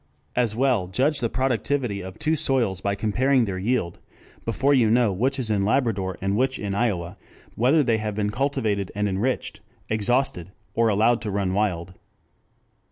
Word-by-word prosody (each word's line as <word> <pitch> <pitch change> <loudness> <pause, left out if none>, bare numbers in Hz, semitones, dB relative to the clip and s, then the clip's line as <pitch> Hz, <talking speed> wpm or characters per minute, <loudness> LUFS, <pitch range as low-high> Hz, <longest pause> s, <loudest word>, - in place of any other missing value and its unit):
As 120 -3 +1
well 125 -7 +1
judge 135 +10 +1
the 115 - -1
productivity 125 -3 -1
of 95 0 -9
two 155 +1 +1
soils 125 - 0
by 100 0 0
comparing 120 +5 +2
their 95 -3 -4
yield 105 -4 -1 0.5
before 135 +5 +2
you 120 -5 +4
know 115 -1 +3
which 130 +8 0
is 120 -5 -2
in 100 -2 +1
Labrador 100 -5 0
and 95 +1 0
which 130 +3 +1
in 100 -2 -3
Iowa, 95 -6 -1 0.4
whether 135 +7 +3
they 115 -4 +1
have 105 -1 -3
been 105 -1 -1
cultivated 110 -6 -1
and 105 0 0
enriched, 100 +7 -2 0.3
exhausted, 110 -5 0 0.2
or 115 -1 +2
allowed 110 +3 +3
to 110 - -3
run 100 -2 -1
wild. 95 -4 -1
110 Hz, 165 wpm, -24 LUFS, 100-130 Hz, 0.5 s, you